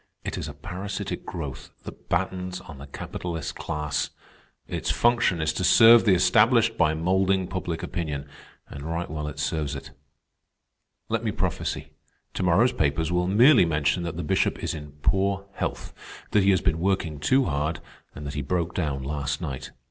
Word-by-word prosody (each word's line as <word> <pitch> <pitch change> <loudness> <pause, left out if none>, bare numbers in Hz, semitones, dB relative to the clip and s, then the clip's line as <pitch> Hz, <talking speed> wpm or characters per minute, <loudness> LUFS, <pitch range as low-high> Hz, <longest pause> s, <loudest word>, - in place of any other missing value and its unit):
It - - -3
is - - -4
a - - -8
parasitic 95 +2 -5
growth 70 -6 -6
that - - -11
battens 90 0 -1
on 75 -6 -11
the 70 - -9
capitalist 80 +2 -5
class. 75 -1 -2 0.6
Its - - -3
function 120 -7 +3
is 80 0 0
to 95 - -2
serve 115 +6 +8
the 100 -4 +5
established 115 +4 +4
by 80 -5 +2
moulding 95 +3 +2
public 90 -3 -4
opinion, 75 -5 -4 0.4
and 70 - -9
right 85 +2 -3
well 75 -1 -3
it 75 0 -7
serves 75 -1 -2
it. - - -8 1.2
"Let - - -1
me - - 0
prophesy. - - -3 0.4
To - - -3
morrow's 95 +8 +4
papers 75 +3 0
will 90 0 +1
merely 120 +7 +6
mention 75 +1 +1
that 85 -2 -4
the 85 - -3
Bishop 95 - 0
is - - -1
in 75 -2 -8
poor 100 0 +1
health, - - -4 0.4
that 105 - +4
he 95 - +3
has 95 -2 +4
been 85 -3 0
working 85 -5 0
too 130 - +3
hard, 75 +1 -1 0.4
and 75 - -7
that 70 - -5
he 75 - -2
broke 85 +4 -1
down 70 -6 -2
last 70 0 -2
night. 65 -1 -5
85 Hz, 175 wpm, -26 LUFS, 75-95 Hz, 1.2 s, serve